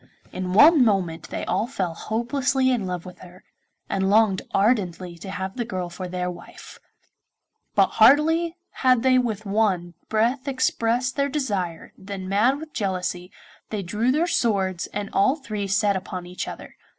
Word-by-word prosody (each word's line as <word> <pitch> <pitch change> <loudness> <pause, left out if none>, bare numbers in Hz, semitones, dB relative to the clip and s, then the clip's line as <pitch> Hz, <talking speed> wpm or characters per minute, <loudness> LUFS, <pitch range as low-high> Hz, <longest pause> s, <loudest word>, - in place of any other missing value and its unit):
In 185 0 -4
one 295 - +7
moment 190 -7 0
they - - -4
all 220 - 0
fell 190 -10 -3
hopelessly 255 +6 0
in 225 -7 -1
love 180 -1 -4
with 180 - -11
her, 180 0 -14 0.4
and 190 0 0
longed 205 -2 +4
ardently 190 -5 0
to 195 - -8
have 190 0 -5
the 245 - -2
girl 185 -6 -4
for 185 +1 -6
their 180 0 -3
wife; 175 -1 -12 1.0
but 200 -2 +6 0.2
hardly 320 +7 +5 0.3
had 255 -3 +4
they 260 -1 +5
with 220 -4 -2
one 195 -4 0 0.2
breath 240 +5 +1
expressed 250 -1 0
their 280 0 +1
desire 200 - -3
than, 190 -1 -7
mad 220 +8 +2
with 310 0 -10
jealousy, 185 -3 -3 0.4
they 210 -2 -3
drew 210 +8 0
their 310 +5 +2
swords 195 - 0
and 205 0 -5
all 205 +8 +3
three 215 -9 -5
set 200 +1 +2
upon 185 -1 -5
each 180 +1 -6
other. - - -9
205 Hz, 165 wpm, -24 LUFS, 185-255 Hz, 1.0 s, one